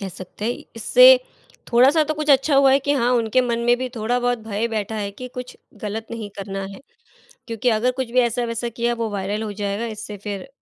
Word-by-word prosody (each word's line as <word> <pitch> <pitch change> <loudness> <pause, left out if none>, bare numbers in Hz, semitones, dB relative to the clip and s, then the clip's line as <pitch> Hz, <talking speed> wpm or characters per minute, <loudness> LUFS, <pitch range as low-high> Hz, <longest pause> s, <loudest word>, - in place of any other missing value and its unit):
कह 195 - -4
सकते 185 +3 -9
हैं, 240 +2 -3
इससे - - +7 0.5
थोड़ा-सा 270 +7 +5
तो 310 - -2
कुछ 305 0 -1
अच्छा 275 +1 +4
हुआ 275 -1 +6
है 270 - +5
कि 285 +1 0
हाँ, 245 -3 +1
उनके 235 +1 +2
मन 235 -2 -1
में 240 0 +5
भी 255 0 -3
थोड़ा 225 +3 0
बहुत 245 -1 0
भय 215 +2 -1
बैठा 220 -1 -3
है 200 -1 -3
कि 250 +5 -9
कुछ 250 0 -7 0.3
गलत 220 +1 -4
नहीं 225 -3 -5
करना 195 0 -5
है 195 - -11 0.7
क्योंकि 230 +1 -2
अगर 225 +3 +2
कुछ 250 -3 -3
भी 255 - +4
ऐसा-वैसा 235 0 -1
किया 235 +1 -1
वो 230 -1 -3
वायरल 205 +2 -3
हो 215 -2 -4
जाएगा 205 +2 -3
इससे 210 -1 -7
फिर 205 +3 -5
230 Hz, 220 wpm, -21 LUFS, 210-250 Hz, 0.7 s, इससे